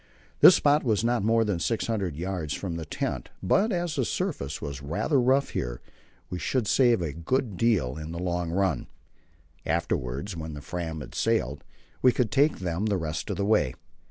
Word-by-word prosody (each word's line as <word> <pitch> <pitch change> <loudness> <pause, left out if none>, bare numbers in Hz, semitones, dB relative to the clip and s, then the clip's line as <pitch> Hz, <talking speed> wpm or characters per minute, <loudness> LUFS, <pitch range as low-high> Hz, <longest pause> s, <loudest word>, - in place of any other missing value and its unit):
This - - +10
spot 145 +1 +3
was 110 -4 +1
not 120 -2 +2
more 115 +1 +3
than 100 -5 -1
600 105 -4 -1
yards 85 -3 -3
from 90 -4 -4
the 80 -2 -5
hut, - - -2
but 195 - +3
as 175 -3 -1
the - - +2
surface 145 - -2
was 70 -3 -6
rather 105 - +1
rough 130 +3 +3
here, - - -3 0.5
we 90 - -5
should 125 +3 0
save 120 -3 +3
a 75 -4 -3
good 105 - -1
deal 90 - +1
in 80 0 -6
the 85 - -5
long 90 -1 -2
run. 95 +2 0 0.8
Afterwards 70 +11 -2
when 80 -2 -6
the 75 - -7
Fram 80 -1 -4
had 65 - -9
sailed, 70 +4 0 0.4
we 130 - +6
could 120 -3 0
take 145 +5 +3
them 90 +3 -2
the 100 -2 +1
rest 80 -3 -4
of - - -2
the 100 - 0
way. 105 - +2
95 Hz, 185 wpm, -27 LUFS, 80-120 Hz, 0.8 s, This